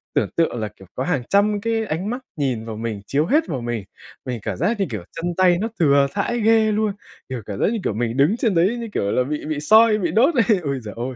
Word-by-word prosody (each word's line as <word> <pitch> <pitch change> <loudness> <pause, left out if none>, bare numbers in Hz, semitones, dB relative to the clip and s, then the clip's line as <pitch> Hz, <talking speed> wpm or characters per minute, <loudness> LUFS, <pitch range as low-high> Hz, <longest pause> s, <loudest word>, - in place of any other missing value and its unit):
tưởng - - +1
tượng 165 -7 +1
là, 110 - -2
kiểu, 95 - -16
có - - -2
hàng 160 -8 -1
trăm 205 +1 +2
cái 225 0 -1
ánh 180 +2 -3
mắt 245 +3 -3 0.2
nhìn 125 -6 -1
vào 110 -1 -6
mình, 110 -2 -4
chiếu 145 +3 +1
hết 300 - +2
vào 135 -8 -3
mình, 120 -4 -4 0.4
mình 125 -2 -3
cảm - - -4
giác 205 - 0
như, 195 - +2
kiểu, 110 -7 -5
chân 175 +1 -3
tay 180 -2 +4
nó 225 - 0
thừa 140 -3 +4
thãi 240 +4 -1
ghê 220 0 +4
luôn, 210 -1 0 0.4
kiểu, 130 -3 -4
cảm 100 -2 -6
giác - - +3
như, 230 - -2
kiểu, - - -1
mình 115 +3 -2
đứng 160 +12 +3
trên 220 -7 +1
đấy 190 +8 +2
như, 235 -1 -5
kiểu, 100 - 0
là 125 - +2
bị 150 +3 -4
bị 155 -1 -2
soi, 220 +7 +5
bị 175 -6 -1
đốt 265 - +3
này. 225 -4 +3
Ôi 140 -2 -2
giời 105 -2 -8
ôi, 125 +2 -4
165 Hz, 270 wpm, -21 LUFS, -, 0.4 s, soi